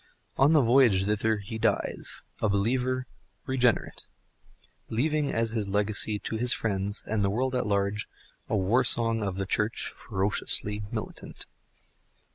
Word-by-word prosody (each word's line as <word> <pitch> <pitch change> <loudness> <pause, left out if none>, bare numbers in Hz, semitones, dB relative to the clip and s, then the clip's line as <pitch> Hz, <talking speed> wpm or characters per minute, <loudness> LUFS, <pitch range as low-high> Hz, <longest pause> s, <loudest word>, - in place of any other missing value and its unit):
On 140 +4 +4
the 150 -4 +5
voyage 115 -6 +4
thither 105 +1 0
he 105 +2 -7
dies, - - -1 0.2
a 110 - +1
believer, 125 +5 0 0.4
regenerate, 125 -4 0 0.8
leaving 145 +5 0
as 115 -2 -1
legacy 105 +1 +1
to 110 - -5
his 125 +2 +2
friends 100 -1 -2
and 105 -1 -1
the 100 - +2
world 130 +6 -1
at 125 -2 -1
large 100 +1 -1 0.4
a - - +1
war 105 +7 +2
song 115 -2 +5
of 100 -3 -3
the 95 - -2
Church 105 +3 -2
(ferociously) 105 +1 -1
Militant. - - -7
110 Hz, 135 wpm, -27 LUFS, 100-125 Hz, 0.8 s, the